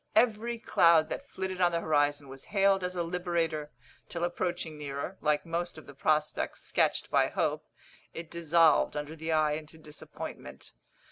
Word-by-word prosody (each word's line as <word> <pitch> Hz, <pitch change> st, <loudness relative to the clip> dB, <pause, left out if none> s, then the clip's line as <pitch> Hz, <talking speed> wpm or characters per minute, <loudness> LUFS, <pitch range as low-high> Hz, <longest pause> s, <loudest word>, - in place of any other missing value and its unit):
Every 230 Hz, +1 st, +2 dB
cloud 165 Hz, -7 st, +4 dB
that 280 Hz, -, -6 dB
flitted 190 Hz, -1 st, -4 dB
on 175 Hz, -1 st, +4 dB
the 170 Hz, -, +1 dB
horizon 145 Hz, -2 st, +1 dB
was 135 Hz, 0 st, -10 dB
hailed 195 Hz, -1 st, +2 dB
as 180 Hz, 0 st, -3 dB
a 175 Hz, -, 0 dB
liberator, 165 Hz, -3 st, -2 dB, 0.4 s
till 170 Hz, 0 st, -4 dB
approaching 175 Hz, -2 st, -2 dB
nearer, 145 Hz, +5 st, -5 dB
like 150 Hz, +1 st, +1 dB
most 170 Hz, 0 st, -3 dB
of 155 Hz, -, -11 dB
the 140 Hz, -, -12 dB
prospects 150 Hz, +2 st, 0 dB
sketched -, -, +1 dB
by -, -, +4 dB
hope, -, -, -1 dB, 0.4 s
it 165 Hz, -1 st, -8 dB
dissolved 165 Hz, -3 st, +3 dB
under 150 Hz, +2 st, -5 dB
the 160 Hz, +1 st, -4 dB
eye 155 Hz, -1 st, +3 dB
into 155 Hz, +1 st, -6 dB
disappointment. 150 Hz, -, -9 dB
165 Hz, 160 wpm, -30 LUFS, 150-180 Hz, 0.4 s, cloud